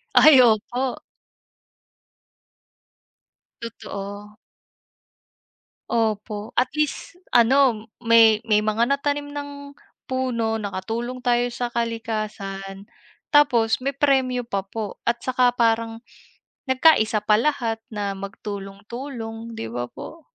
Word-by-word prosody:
Ay, 305 Hz, -4 st, +8 dB
opo. 245 Hz, +3 st, +1 dB, 2.7 s
Totoo. 205 Hz, -2 st, -8 dB, 1.5 s
Opo. 215 Hz, -2 st, -1 dB
At 250 Hz, +1 st, +2 dB
least, 300 Hz, +1 st, -2 dB, 0.2 s
ano 240 Hz, -2 st, +4 dB, 0.2 s
may 225 Hz, -2 st, +6 dB
may 210 Hz, -2 st, +1 dB
mga 225 Hz, +3 st, +1 dB
natanim 285 Hz, +1 st, -1 dB
ng 285 Hz, 0 st, -6 dB, 0.6 s
puno, 235 Hz, -4 st, -1 dB
nakatulong 225 Hz, +5 st, -4 dB
tayo 245 Hz, -1 st, +2 dB
sa 245 Hz, 0 st, -3 dB
kalikasan. 215 Hz, -4 st, -4 dB, 0.4 s
Tapos, 245 Hz, -7 st, +4 dB
may 275 Hz, -, 0 dB
premyo 265 Hz, -3 st, +2 dB
pa 195 Hz, -1 st, -2 dB
po 210 Hz, 0 st, -6 dB
at 235 Hz, 0 st, 0 dB
saka 250 Hz, -1 st, +2 dB
parang, 225 Hz, -1 st, 0 dB, 0.7 s
nagka-isa 255 Hz, -5 st, +4 dB
pa 210 Hz, 0 st, +3 dB
lahat 235 Hz, -6 st, -1 dB
na 205 Hz, -3 st, -3 dB
magtulong-tulong, 225 Hz, +4 st, -7 dB
'di 115 Hz, -, -4 dB
ba 120 Hz, 0 st, -3 dB
po? 325 Hz, -, -11 dB
230 Hz, 95 wpm, -23 LUFS, 210-255 Hz, 2.7 s, Ay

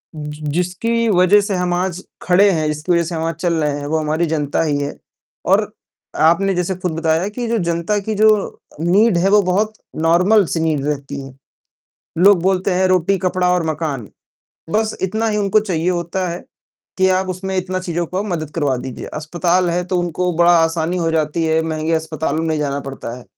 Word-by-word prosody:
ज 150 Hz, -1 st, -6 dB, 0.2 s
जिसकी 180 Hz, +9 st, -1 dB
वज़ह 190 Hz, +1 st, +5 dB
से 200 Hz, -1 st, -2 dB
हम 180 Hz, -1 st, 0 dB
आज 180 Hz, +1 st, -2 dB, 0.2 s
खड़े 190 Hz, +3 st, +4 dB
हैं, 155 Hz, -4 st, 0 dB
जिसकी 150 Hz, +3 st, -2 dB
वज़ह 170 Hz, -1 st, +3 dB
से 170 Hz, +1 st, -5 dB
हम 160 Hz, -, -2 dB
आज 165 Hz, 0 st, -1 dB
चल 170 Hz, +1 st, -1 dB
रहे 145 Hz, -1 st, -1 dB
हैं, 145 Hz, -, -6 dB
वो 160 Hz, +2 st, 0 dB
हमारी 155 Hz, +2 st, 0 dB
जनता 150 Hz, -3 st, -1 dB
ही 150 Hz, -3 st, 0 dB
है 145 Hz, 0 st, -4 dB, 0.5 s
और -, -, +4 dB, 0.6 s
आपने 195 Hz, +4 st, +2 dB
जैसे 180 Hz, +1 st, -1 dB
खुद 180 Hz, -1 st, -3 dB
बताया 165 Hz, +3 st, +1 dB
कि 240 Hz, +3 st, -4 dB
जो 230 Hz, 0 st, 0 dB
जनता 170 Hz, +2 st, -1 dB
की 215 Hz, +2 st, -3 dB
जो 215 Hz, +1 st, +5 dB, 0.5 s
नीड 190 Hz, +5 st, +3 dB
है, 185 Hz, +3 st, +2 dB
वो 205 Hz, +1 st, +5 dB
बहुत 200 Hz, +4 st, 0 dB, 0.3 s
नॉर्मल 180 Hz, +6 st, +4 dB
सी -, -, 0 dB
नीड 155 Hz, -4 st, 0 dB
रहती 140 Hz, -1 st, -3 dB
है। 135 Hz, -1 st, -10 dB, 0.9 s
लोग 190 Hz, 0 st, +5 dB
बोलते 190 Hz, +1 st, +1 dB
हैं 185 Hz, +1 st, +2 dB
,रोटी, 185 Hz, +1 st, +2 dB
कपड़ा 185 Hz, 0 st, 0 dB
और 180 Hz, -2 st, 0 dB
मकान, 145 Hz, -, -4 dB, 0.6 s
बस 220 Hz, +4 st, 0 dB
इतना 220 Hz, +4 st, -1 dB
ही 210 Hz, -1 st, 0 dB
उनको 205 Hz, 0 st, +3 dB
चाहिए 180 Hz, -5 st, -1 dB
होता 180 Hz, +1 st, -2 dB
है, 170 Hz, +1 st, -5 dB, 0.6 s
कि 190 Hz, 0 st, +4 dB
आप 185 Hz, 0 st, +1 dB
उसमें 190 Hz, +1 st, -4 dB
इतना 185 Hz, 0 st, -2 dB
चीज़ों 175 Hz, -1 st, -2 dB
को 185 Hz, +4 st, -3 dB
मदद 165 Hz, -7 st, -3 dB
करवा 145 Hz, -5 st, 0 dB
दीजिए। 125 Hz, 0 st, -7 dB
अस्पताल 175 Hz, +3 st, 0 dB
है 175 Hz, +1 st, -1 dB
तो 185 Hz, -, -1 dB
उनको 175 Hz, +1 st, -1 dB
बड़ा 175 Hz, +1 st, +5 dB
आसानी 165 Hz, +1 st, 0 dB
हो 165 Hz, -2 st, 0 dB
जाती 160 Hz, 0 st, 0 dB
है, 160 Hz, 0 st, +2 dB
महँगे 160 Hz, 0 st, -2 dB
अस्पतालों 160 Hz, -1 st, -2 dB
में 165 Hz, -, -1 dB
नहीं 155 Hz, -, 0 dB
जाना 140 Hz, -1 st, -2 dB
पड़ता 135 Hz, -3 st, -7 dB
है, 125 Hz, -, -12 dB
175 Hz, 205 wpm, -18 LUFS, 160-190 Hz, 0.9 s, वज़ह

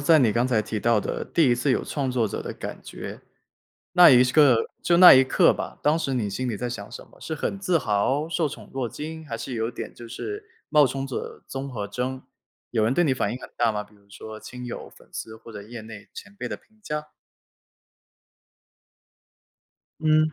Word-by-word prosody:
在 155 Hz, +2 st, +5 dB
你 115 Hz, -6 st, +4 dB
刚 120 Hz, +3 st, +2 dB
才 120 Hz, -4 st, +2 dB
提 110 Hz, 0 st, -4 dB
到 115 Hz, 0 st, +3 dB
的 -, -, -3 dB
第 160 Hz, -5 st, +2 dB
1 120 Hz, -, +4 dB
次 120 Hz, +4 st, 0 dB
有 -, -, +1 dB
创 140 Hz, -3 st, -2 dB
作 125 Hz, -3 st, +1 dB
者 100 Hz, -, -4 dB
的 -, -, -5 dB
感 -, -, -7 dB
觉， -, -, -8 dB, 0.7 s
那 180 Hz, -1 st, +9 dB
一 125 Hz, -2 st, +7 dB
时 125 Hz, -, -1 dB
刻 135 Hz, -7 st, +5 dB
就 170 Hz, -, +3 dB
那 180 Hz, +1 st, +11 dB
一 130 Hz, -, +7 dB
刻 130 Hz, -, +4 dB
吧， -, -, -6 dB
当 150 Hz, +2 st, +3 dB
时 140 Hz, -5 st, -2 dB
你 115 Hz, -5 st, 0 dB
心 125 Hz, +6 st, -3 dB
里 110 Hz, -, -2 dB
在 120 Hz, +2 st, -3 dB
想 100 Hz, -4 st, -6 dB
什 -, -, -9 dB
么？ -, -, -21 dB
是 160 Hz, -, -4 dB
很 195 Hz, +5 st, -3 dB
自 185 Hz, -3 st, +2 dB
豪？ 135 Hz, +7 st, 0 dB
受 165 Hz, -2 st, 0 dB
宠 -, -, -10 dB
若 130 Hz, -3 st, -2 dB
惊？ 160 Hz, +7 st, -7 dB
还 115 Hz, -, -4 dB
是 130 Hz, -, -5 dB
有 115 Hz, 0 st, -1 dB
点 120 Hz, -, -7 dB
就 120 Hz, -, -11 dB
是 415 Hz, -, -6 dB, 0.2 s
冒 150 Hz, -2 st, +5 dB
充 135 Hz, +1 st, -3 dB
者 135 Hz, -, -6 dB
综合征？ 130 Hz, -1 st, -4 dB, 0.5 s
有 115 Hz, -2 st, +1 dB
人 115 Hz, -, +2 dB
对 175 Hz, +6 st, +3 dB
你 140 Hz, -5 st, +2 dB
反 -, -, -1 dB
应 125 Hz, -, -5 dB
很 -, -, -9 dB
大 120 Hz, -1 st, +3 dB
吗？ 105 Hz, -1 st, -3 dB
比 105 Hz, -, -23 dB
如 100 Hz, -1 st, -24 dB
说 110 Hz, +2 st, -9 dB
亲 125 Hz, 0 st, -8 dB
友、 120 Hz, -, -7 dB
粉 -, -, -20 dB
丝 110 Hz, 0 st, -6 dB
或 115 Hz, +1 st, -13 dB
者 105 Hz, -1 st, -8 dB
业 115 Hz, +2 st, -9 dB
内 110 Hz, -2 st, -11 dB
前 205 Hz, -, -11 dB
辈 -, -, -4 dB
的 -, -, -4 dB
评 220 Hz, 0 st, -30 dB
价？ 150 Hz, -4 st, -4 dB, 2.9 s
嗯。 155 Hz, 0 st, +3 dB
130 Hz, 235 characters per minute, -25 LUFS, 115-150 Hz, 2.9 s, 那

